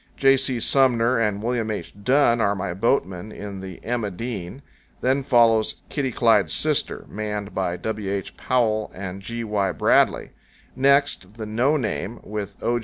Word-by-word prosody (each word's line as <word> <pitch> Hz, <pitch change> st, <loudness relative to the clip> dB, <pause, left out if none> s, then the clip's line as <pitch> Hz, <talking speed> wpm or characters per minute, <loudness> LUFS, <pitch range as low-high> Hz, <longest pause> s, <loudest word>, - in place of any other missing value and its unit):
J. 135 Hz, 0 st, +5 dB
C. 130 Hz, -2 st, 0 dB
Sumner 125 Hz, -1 st, +3 dB
and 105 Hz, -2 st, 0 dB
William 120 Hz, -2 st, -1 dB
H. 105 Hz, -, -5 dB
Dunn 125 Hz, -2 st, +3 dB
are 100 Hz, -2 st, +2 dB
my 90 Hz, -2 st, -3 dB
boatmen 95 Hz, -2 st, 0 dB
in 100 Hz, -2 st, -7 dB
the 95 Hz, -2 st, -8 dB
"Emma 115 Hz, -3 st, -1 dB
Dean"; 105 Hz, +4 st, -6 dB, 0.4 s
then 130 Hz, +2 st, +2 dB
follows 115 Hz, -4 st, +3 dB
"Kitty 135 Hz, -3 st, -1 dB
Clyde's -, -, +3 dB
Sister," -, -, 0 dB
manned 105 Hz, -1 st, -4 dB
by 90 Hz, -2 st, -1 dB
W. 105 Hz, +1 st, -3 dB
H. 100 Hz, -2 st, -4 dB
Powell 110 Hz, -4 st, 0 dB
and 95 Hz, 0 st, -6 dB
G. 115 Hz, +3 st, -5 dB
Y. 105 Hz, -3 st, 0 dB
Bradley; -, -, +2 dB, 0.4 s
next, 140 Hz, -7 st, +2 dB
the 110 Hz, -1 st, -6 dB
"No 120 Hz, +8 st, +1 dB
Name," 115 Hz, -3 st, -3 dB
with 105 Hz, -1 st, -5 dB
O. 120 Hz, 0 st, +1 dB
110 Hz, 160 wpm, -23 LUFS, 100-125 Hz, 0.4 s, J